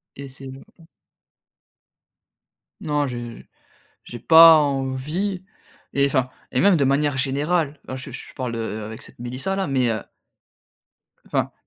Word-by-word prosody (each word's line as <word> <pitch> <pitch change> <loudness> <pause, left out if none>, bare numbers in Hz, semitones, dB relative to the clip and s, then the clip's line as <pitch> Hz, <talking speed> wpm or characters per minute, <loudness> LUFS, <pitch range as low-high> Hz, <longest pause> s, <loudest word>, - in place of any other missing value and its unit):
Et 140 0 -8
c'est 135 +1 -13
m 135 +1 -10 2.2
Non, 145 -2 0
j'ai 120 -2 -7 0.6
j'ai 120 - -9
pas 165 +3 +8
envie 150 +7 -2 0.5
et 140 0 +3
enfin, 130 -2 0 0.2
et - - 0
même 200 -1 +5
de 145 - +2
manière 140 0 +1
générale, 145 +3 -1
alors 130 - -5
je 130 - -8
je - - -9
parle, 125 -3 -4
heu, 110 -1 -4
avec 110 +1 -8
cette - - -14
Mélissa 130 +10 -3
là, 195 - -1
mais 130 -3 +1
heu 110 -3 -2 1.2
enfin, - - -1
135 Hz, 140 wpm, -22 LUFS, 125-150 Hz, 2.2 s, pas